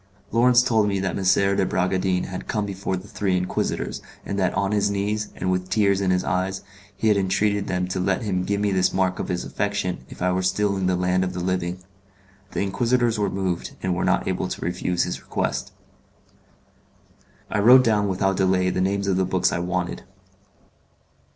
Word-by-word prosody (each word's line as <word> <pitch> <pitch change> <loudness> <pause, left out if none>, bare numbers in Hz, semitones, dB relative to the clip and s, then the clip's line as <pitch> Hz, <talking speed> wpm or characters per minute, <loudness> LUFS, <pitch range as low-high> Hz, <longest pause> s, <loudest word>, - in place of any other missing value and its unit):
Lawrence 125 +1 +5
told 110 -4 +2
me 100 -1 0
that 95 0 -2
M. 95 +1 +2
de - - +3
Bragadin 95 0 0
had 95 0 -6
come 105 -1 -1
before 95 -1 -3
the 95 +3 -10
three 95 -3 0
Inquisitors, 90 0 -2 0.2
and 100 - -3
that 95 -2 +2
on 100 0 0
his 105 -1 +2
knees, 105 +2 -1
and 95 - -1
with 90 0 -2
tears 100 0 +2
in 95 - +1
his 90 0 +2
eyes, 95 +1 -1 0.3
he 110 - 0
had 105 - +4
entreated 100 +1 +1
them 90 -1 -1
to 95 - -2
let 95 +5 0
him 95 -4 -1
give 100 +2 -1
me 105 -1 +1
this 95 -1 +2
mark 95 -1 0
of - - -3
his 90 - -2
affection 100 -3 -2
if - - -11
I 90 0 +1
were 90 +1 0
still 100 +2 +1
in 95 -1 -1
the 90 - +2
land 90 +1 +1
of 90 0 -3
the 90 - -4
living; 90 0 -2 0.7
the - - -3
Inquisitors 115 +3 +1
were 100 - +1
moved, 95 -3 -3
and 95 -1 +1
were 85 - -1
not - - +1
able - - -1
to - - -5
refuse 90 0 0
his - - -4
request. - - -2 1.8
I 105 - 0
wrote 125 +5 +8
down 105 -4 +2
without 95 0 0
delay 95 -1 +2
the 90 - -1
names 100 +1 0
of 95 -2 +1
the 95 - +2
books 95 0 +1
I - - -1
wanted. 90 0 -2
95 Hz, 200 wpm, -23 LUFS, 90-100 Hz, 1.8 s, wrote